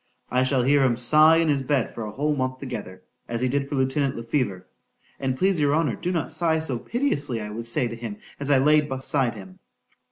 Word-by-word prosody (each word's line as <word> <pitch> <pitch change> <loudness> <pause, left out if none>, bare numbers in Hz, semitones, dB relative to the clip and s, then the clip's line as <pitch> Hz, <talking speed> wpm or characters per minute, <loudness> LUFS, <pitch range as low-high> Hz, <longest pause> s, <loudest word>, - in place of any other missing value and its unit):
—I 125 +1 +2
shall 130 -1 +2
hear 140 +2 +3
him 120 -3 +2
sigh 155 +6 +6
in 165 0 +2
his 145 -2 +1
bed 135 -2 -1
for - - -7
a 105 - -6
whole 150 +6 -1
month 130 -1 -2
together, 110 -9 -7 0.3
as 115 0 -2
he 130 - +1
did 140 +2 -1
for 145 - -3
lieutenant 135 +1 0
Le 115 - -6
Fever. 115 -7 -2 0.5
An' 130 -1 -1
please 190 0 +1
your 145 0 +2
honour, 155 -6 0
do 180 - -3
not 165 -4 -2
sigh 165 -2 +1
so 140 -7 -3
piteously, 145 - -1
I 105 -1 -6
would 115 +2 -6
say 120 +1 +1
to 115 - -6
him 115 -3 -7 0.2
as 140 0 -1
I 140 - +5
laid 150 +2 +3
besides 130 -2 0
him. 95 -3 -12
135 Hz, 230 wpm, -24 LUFS, 120-150 Hz, 0.5 s, sigh